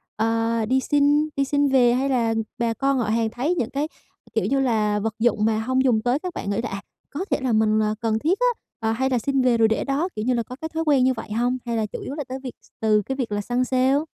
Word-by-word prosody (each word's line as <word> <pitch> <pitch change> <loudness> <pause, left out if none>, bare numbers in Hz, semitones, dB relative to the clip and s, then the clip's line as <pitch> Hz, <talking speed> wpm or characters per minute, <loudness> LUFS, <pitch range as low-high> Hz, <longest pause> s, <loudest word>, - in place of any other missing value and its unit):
ờ, 225 +1 0
đi 260 +4 +2
xin 290 +2 +2
đi 275 - +2
xin 285 +1 +1
về? 245 -3 +4
Hay 270 +2 0
là 235 -4 +1 0.2
bà 235 -1 0
con 275 +2 0
họ 240 - 0
hàng 225 +1 +1
thấy 275 +10 -1
những 240 -8 -1
cái, 285 +3 -2 0.5
kiểu - - 0
như 275 - +1
là, 215 -5 +1
vật 220 +1 -2
dụng 220 -2 +2
mà 220 -1 +1
hông 260 +4 +1
dùng 240 -5 +3
tới 245 +4 +1
các 360 +1 -5
bạn 200 - -5
nghĩ 200 - -1
là - - -3
"À, 195 0 -5 0.3
có 335 +7 -4
thể - - +3
là 255 -3 0
mình, 215 0 +3
à, 215 0 0
cần 220 -1 0
thiết 340 - +1
á, - - +3 0.4
à, 225 - +1
hay 265 +3 0
là 250 -2 +1
xin 270 +3 0
về 250 -2 +3
rồi 225 -1 +5
để 220 - 0
đó." 285 +6 -1
Kiểu 215 - -3
như 255 - +2
là 235 -1 0
có 250 - -9
cái 320 - -4
thói 325 - -1
quen 280 -4 +4
như 260 0 +3
vậy 225 -3 -8
hông? 245 +3 0
Hay 235 -1 -2
là 220 - 0
chủ 210 - -7
yếu 275 - -6
là 295 - -3
tới 260 +1 -5
việc 255 - -6
s - - -23
từ 215 -1 +3
cái 265 +6 -4
việc 250 -5 -3
là 205 - -1
săn 245 +4 0
sale? 260 +2 +2
245 Hz, 295 wpm, -23 LUFS, 225-275 Hz, 0.5 s, rồi